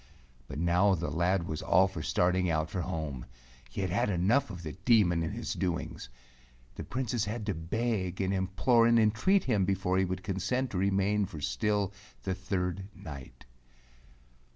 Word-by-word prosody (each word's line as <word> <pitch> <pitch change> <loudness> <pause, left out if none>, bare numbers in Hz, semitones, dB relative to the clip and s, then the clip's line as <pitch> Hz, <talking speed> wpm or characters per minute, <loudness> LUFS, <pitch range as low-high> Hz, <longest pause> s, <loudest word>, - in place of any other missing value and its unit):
But 70 - -7
now 90 +4 +3
the 85 -3 -3
lad 85 +3 +1
was 75 - -3
all 95 +3 +4
for 95 -4 -6
starting 90 +3 +1
out 80 -1 0
for 90 - -2
home. 80 -8 -4 0.4
He - - -4
had 95 -2 -1
had 100 +2 +1
enough 105 +9 +2
of 90 -3 -8
the 80 - -4
Demon 95 -5 +3
and 80 - -3
his - - -3
doings. 90 -8 -3 0.6
The - - -6
Princess 120 -3 -2
had 110 +1 -4
to 105 - 0
beg 95 +2 -2
and 95 0 0
implore 100 +5 +3
and 115 0 +5
entreat 115 - +3
him 110 -7 +1
before 95 -1 +1
he 95 - +3
would 95 0 -4
consent 105 +7 -1
to 90 - -2
remain 100 +1 +2
for 85 -5 -8
still 105 +5 0 0.3
the 95 - -1
third 95 0 -3
night. 70 -4 -10
95 Hz, 175 wpm, -30 LUFS, 85-105 Hz, 0.6 s, and